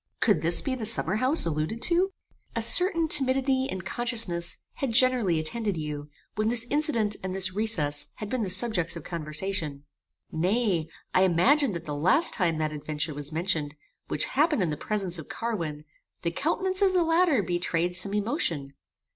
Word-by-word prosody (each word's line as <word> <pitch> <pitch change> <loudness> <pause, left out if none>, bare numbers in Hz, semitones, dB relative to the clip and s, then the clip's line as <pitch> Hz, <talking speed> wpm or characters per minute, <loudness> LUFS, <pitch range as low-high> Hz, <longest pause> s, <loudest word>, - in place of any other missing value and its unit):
Could 205 -9 +2
this 165 +2 0
be 270 - -2
the 255 -3 -4
summerhouse 230 - +2
alluded 160 +7 -2
to? 360 +3 +2 0.4
A - - 0
certain 335 -3 +4
timidity 265 -2 +4
and 185 -1 -5
consciousness 220 -7 0 0.2
had 265 -4 -2
generally 245 -8 +3
attended 200 +5 -2
you, 150 -1 -5 0.2
when 215 +1 0
this 235 -1 +1
incident 250 -9 +1
and 190 0 -4
this 190 -1 0
recess 170 -9 0
had 215 - -6
been 250 +3 -2
the 200 - -2
subjects 185 -4 +2
of 170 - -8
conversation. 155 -2 -4 0.5
Nay, 180 -1 0 0.3
I 185 - +4
imagined 195 - +3
that 170 0 -6
the 150 - -5
last 185 - +3
time 170 -6 0
that 155 -1 -1
adventure 150 +1 -4
was 145 +1 -4
mentioned, 160 -3 -2 0.3
which - - +1
happened 300 - +1
in 165 - -1
the - - -2
presence 190 0 0
of 160 - -10
Carwin, 165 -11 -4 0.4
the 170 - -1
countenance 370 - -1
of 385 -2 +3
the 360 -2 +3
latter 330 - +2
betrayed 175 0 -2
some 200 +3 0
emotion. 200 - -2
195 Hz, 170 wpm, -26 LUFS, 165-255 Hz, 0.5 s, certain